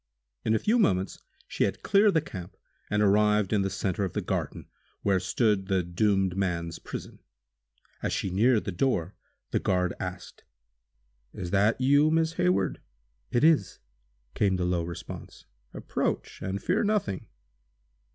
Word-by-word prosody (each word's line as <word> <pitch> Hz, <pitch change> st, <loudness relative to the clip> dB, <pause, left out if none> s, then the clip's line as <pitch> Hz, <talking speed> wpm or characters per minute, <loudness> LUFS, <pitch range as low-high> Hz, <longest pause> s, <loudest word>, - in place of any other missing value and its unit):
In 110 Hz, -, +2 dB
a -, -, +4 dB
few 225 Hz, -, +2 dB
moments 95 Hz, -, +1 dB, 0.3 s
she -, -, 0 dB
had -, -, -4 dB
cleared 200 Hz, -1 st, +4 dB
the 160 Hz, -, +4 dB
camp, 95 Hz, -, -9 dB, 0.3 s
and 105 Hz, 0 st, +2 dB
arrived 105 Hz, 0 st, +3 dB
in 105 Hz, -, +3 dB
the 95 Hz, -, 0 dB
center 95 Hz, 0 st, -2 dB
of 95 Hz, -, -3 dB
the -, -, -1 dB
garden, -, -, -3 dB, 0.4 s
where 100 Hz, -2 st, +3 dB
stood 95 Hz, +1 st, +1 dB
the 95 Hz, -2 st, +1 dB
doomed 95 Hz, +1 st, +1 dB
man's 85 Hz, -4 st, -2 dB
prison. -, -, -8 dB, 0.8 s
As -, -, -1 dB
she 95 Hz, -, -2 dB
neared 110 Hz, +4 st, +3 dB
the 100 Hz, -, -2 dB
door, 95 Hz, -3 st, 0 dB, 0.4 s
the -, -, +1 dB
guard 90 Hz, -2 st, +1 dB
asked: 90 Hz, 0 st, -7 dB, 0.9 s
"Is 90 Hz, -1 st, -5 dB
that 105 Hz, +4 st, +3 dB
you, 145 Hz, +4 st, +4 dB
Miss 160 Hz, 0 st, +2 dB
Hayward?" 95 Hz, -, +1 dB, 0.5 s
"It 120 Hz, -, +1 dB
is!" 160 Hz, -1 st, +3 dB, 0.6 s
came 100 Hz, -2 st, +2 dB
the 90 Hz, -1 st, -1 dB
low 90 Hz, -1 st, +1 dB
response. 85 Hz, 0 st, -8 dB, 0.3 s
"Approach -, -, -3 dB
and 95 Hz, +1 st, -3 dB
fear 190 Hz, +5 st, +1 dB
nothing." 205 Hz, -, -1 dB
100 Hz, 150 wpm, -28 LUFS, 90-120 Hz, 0.9 s, a